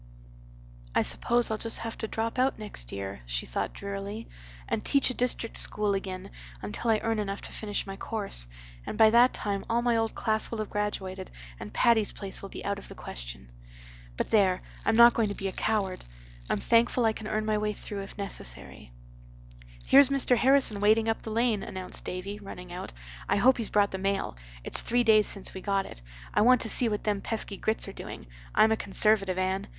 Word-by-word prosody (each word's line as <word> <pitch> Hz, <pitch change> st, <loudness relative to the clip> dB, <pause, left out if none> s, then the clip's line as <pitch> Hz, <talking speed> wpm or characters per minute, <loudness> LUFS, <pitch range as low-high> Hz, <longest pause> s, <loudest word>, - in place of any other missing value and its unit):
"I -, -, +3 dB
suppose 240 Hz, -1 st, +1 dB
I'll 215 Hz, -, -2 dB
just 230 Hz, -, 0 dB
have 225 Hz, 0 st, -6 dB
to 220 Hz, -, -3 dB
drop 225 Hz, +3 st, -3 dB
out 260 Hz, +1 st, +2 dB
next 205 Hz, -, -3 dB
year," 100 Hz, -5 st, -6 dB
she -, -, -3 dB
thought -, -, -3 dB
drearily, 200 Hz, +2 st, -6 dB, 0.4 s
"and -, -, -2 dB
teach 275 Hz, -2 st, +2 dB
a -, -, -4 dB
district 245 Hz, -2 st, 0 dB
school 210 Hz, -1 st, +4 dB
again 190 Hz, -1 st, -5 dB, 0.3 s
until 105 Hz, -, -4 dB
I 220 Hz, -1 st, +3 dB
earn 225 Hz, -1 st, 0 dB
enough 200 Hz, -1 st, -4 dB
to -, -, -9 dB
finish 205 Hz, -2 st, -4 dB
my 195 Hz, -1 st, -7 dB
course. 200 Hz, -, +5 dB, 0.4 s
And -, -, -6 dB
by 220 Hz, -1 st, +6 dB
that 240 Hz, +2 st, +6 dB
time 200 Hz, -2 st, -3 dB
all 235 Hz, +1 st, +1 dB
my 240 Hz, -1 st, +2 dB
old 225 Hz, 0 st, -1 dB
class 220 Hz, 0 st, -1 dB
will 230 Hz, -, -5 dB
have 215 Hz, -1 st, -5 dB
graduated 195 Hz, -2 st, -4 dB, 0.3 s
and 105 Hz, -, -8 dB
Patty's 225 Hz, -, +2 dB
Place 195 Hz, -2 st, -3 dB
will 195 Hz, -, -8 dB
be -, -, -8 dB
out 200 Hz, 0 st, -2 dB
of -, -, -13 dB
the -, -, -11 dB
question. -, -, -9 dB, 0.7 s
But -, -, -3 dB
there! 190 Hz, -4 st, +3 dB, 0.2 s
I'm 225 Hz, -, +2 dB
not 235 Hz, +1 st, +8 dB
going 220 Hz, -3 st, 0 dB
to 200 Hz, -, -4 dB
be 195 Hz, -, -4 dB
a -, -, -3 dB
coward. 200 Hz, -2 st, -2 dB, 0.5 s
I'm -, -, +1 dB
thankful 230 Hz, -, +2 dB
I 220 Hz, -, +2 dB
can 215 Hz, -1 st, -8 dB
earn 215 Hz, 0 st, -2 dB
my 215 Hz, -1 st, 0 dB
way 210 Hz, 0 st, -1 dB
through 205 Hz, -1 st, -7 dB
if 195 Hz, -, -10 dB
necessary." -, -, -7 dB, 0.9 s
"Here's 275 Hz, 0 st, +7 dB
Mr. 275 Hz, -2 st, +3 dB
Harrison 260 Hz, -4 st, +2 dB
wading 220 Hz, +2 st, +3 dB
up 225 Hz, -, -1 dB
the -, -, -7 dB
lane," 225 Hz, -1 st, +1 dB
announced 185 Hz, -1 st, -5 dB
Davy, 195 Hz, +3 st, -6 dB
running 180 Hz, -3 st, -10 dB
out. 180 Hz, -, -7 dB, 0.4 s
"I -, -, +3 dB
hope 250 Hz, +6 st, +4 dB
he's 230 Hz, -3 st, -1 dB
brought 205 Hz, -1 st, +2 dB
the 190 Hz, -, -4 dB
mail. 195 Hz, -, -2 dB, 0.3 s
It's -, -, +6 dB
three 245 Hz, +1 st, +1 dB
days 215 Hz, -2 st, +4 dB
since 195 Hz, -, -4 dB
we 190 Hz, -, -7 dB
got 195 Hz, -1 st, 0 dB
it. -, -, -11 dB, 0.3 s
I -, -, +2 dB
want 250 Hz, +3 st, +5 dB
to 225 Hz, -, -3 dB
see 240 Hz, +1 st, 0 dB
what 210 Hz, -1 st, -3 dB
them 205 Hz, -2 st, -1 dB
pesky 215 Hz, -2 st, -3 dB
Grits 220 Hz, +3 st, -1 dB
are -, -, -7 dB
doing. -, -, -9 dB, 0.3 s
I'm 220 Hz, -, +5 dB
a -, -, +4 dB
Conservative, 200 Hz, -2 st, +3 dB
Anne. 190 Hz, +2 st, -1 dB
210 Hz, 210 wpm, -28 LUFS, 195-225 Hz, 0.9 s, not